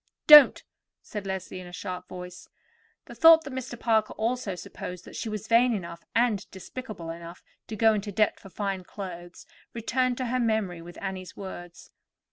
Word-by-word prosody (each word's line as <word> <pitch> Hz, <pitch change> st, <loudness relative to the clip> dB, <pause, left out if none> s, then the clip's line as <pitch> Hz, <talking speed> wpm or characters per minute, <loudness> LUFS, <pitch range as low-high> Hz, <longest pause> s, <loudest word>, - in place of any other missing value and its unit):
"Don't," 300 Hz, -2 st, +9 dB, 0.4 s
said 205 Hz, -2 st, -6 dB
Leslie 190 Hz, -1 st, -5 dB
in 180 Hz, -, -9 dB
a -, -, -11 dB
sharp 180 Hz, 0 st, -6 dB
voice. 180 Hz, 0 st, -9 dB, 0.6 s
The -, -, -11 dB
thought 325 Hz, 0 st, +7 dB
that 275 Hz, -, -8 dB
Mr. 255 Hz, -2 st, -6 dB
Parker 220 Hz, -2 st, +1 dB
also 225 Hz, -3 st, -2 dB
supposed 180 Hz, 0 st, -8 dB
that -, -, -12 dB
she 225 Hz, -, -4 dB
was 215 Hz, -1 st, -5 dB
vain 235 Hz, +1 st, +4 dB
enough 170 Hz, -3 st, -7 dB
and 230 Hz, -4 st, +1 dB
despicable 190 Hz, -3 st, -8 dB
enough 170 Hz, +1 st, -10 dB, 0.2 s
to 220 Hz, -, -5 dB
go 225 Hz, 0 st, +4 dB
into 205 Hz, 0 st, -3 dB
debt 210 Hz, +2 st, +1 dB
for 195 Hz, -, -13 dB
fine 195 Hz, -1 st, -3 dB
clothes 175 Hz, -2 st, -9 dB, 0.3 s
returned 250 Hz, +2 st, 0 dB
to 255 Hz, -, -2 dB
her 250 Hz, +1 st, -1 dB
memory 220 Hz, -7 st, 0 dB
with 175 Hz, +1 st, -11 dB
Annie's 190 Hz, -2 st, -6 dB
words. 175 Hz, -3 st, -9 dB
200 Hz, 175 wpm, -27 LUFS, 180-235 Hz, 0.6 s, Don't